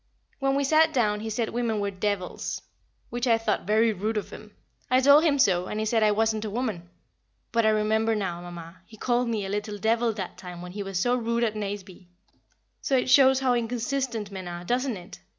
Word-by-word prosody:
When 270 -1 +1
we 280 - +1
sat 315 +3 +4
down 210 -5 +1
he 220 +1 -5
said 220 +1 -1
women 230 -3 -1
were 200 0 -1
devils, 195 -1 -3 0.5
which 240 +1 -2
I 230 -1 +5
thought 215 -4 -2
very 220 +1 +3
rude 215 +3 -2
of 210 - -4
him. 210 -1 -12 0.3
I 255 +1 +4
told 285 +3 +6
him 300 -4 +3
so, 180 -8 +3
and 210 - -3
he 215 - -1
said 225 +1 +1
I 215 - +5
wasn't 220 +1 +1
a 215 - -3
woman; 205 -7 -3 0.6
but 230 -1 +2
I - - +6
remember 220 +1 +2
now, 180 -4 -3
Mamma, 175 0 -9
he 220 - -14
called 245 +1 0
me 215 -3 -1
a - - -5
"little 210 +1 -3
devil" 230 +3 +1
that 195 -4 -6
time 180 -1 -8
when 180 - -8
he 205 +3 -5
was 195 -2 -4
so 245 +7 +2
rude 235 -1 0
at 220 -2 0
Nazeby, 200 -3 -6 0.7
so 270 - +1
it 255 0 0
shows 265 0 +6
how 255 -2 +3
inconsistent 240 -2 -2
men 190 -2 -7
are, 175 0 -6
doesn't 245 +3 -1
it? 180 +3 -12
220 Hz, 220 wpm, -26 LUFS, 200-245 Hz, 0.7 s, told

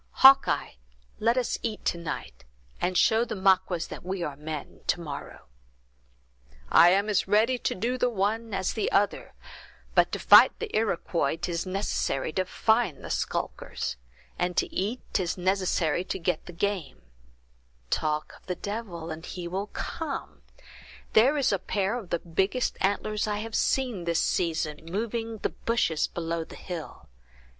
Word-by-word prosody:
Hawkeye, 275 0 +7 0.5
let 230 +3 +2
us 250 - 0
eat 220 -3 -4
to - - +1
night, 165 - -6 0.4
and 180 0 +1
show 220 +5 +4
the 230 -2 -4
Maquas 185 -3 +2
that - - -8
we 185 0 -3
are 145 -4 -4
men 150 +1 -7
to - - +2
morrow." 145 -4 -7 1.3
"I 175 - +8
am 200 +3 +3
as 210 -3 +1
ready 220 +5 +3
to - - -1
do 245 +6 -1
the 250 - +3
one 220 +1 -1
as 190 -2 -1
the 220 - -1
other; 205 0 +1 0.6
but - - +4
to - - -1
fight - - +7
the 455 -2 -5
Iroquois 170 -7 0
'tis 175 +1 -2
necessary 185 -7 -1
to 185 +2 0
find 220 - +1
the - - -5
skulkers; - - -3 0.4
and 180 0 -1
to - - +1
eat, 215 +7 -1
'tis 180 -2 0
necessary 180 -3 +1
to - - -3
get 175 -2 -2
the - - -6
game—talk - - -4
of - - -27
the 180 - -2
devil 185 -5 -5
and 160 +1 -7
he 175 -2 -5
will 190 +4 -3
come; 310 +6 -5 0.7
there 260 +7 +5
is 275 -3 +2
a 200 - +1
pair 200 +3 -1
of 220 -7 -6
the 170 - +1
biggest 190 +9 0
antlers 210 +2 0
I 210 -1 -1
have 220 +1 -5
seen 240 -10 0
this 170 -1 +1
season, 160 -4 0
moving 225 +5 -3
the - - -1
bushes 220 -9 0
below 165 -1 -3
the - - -12
hill! 175 -4 -8
190 Hz, 160 wpm, -27 LUFS, 165-220 Hz, 1.3 s, I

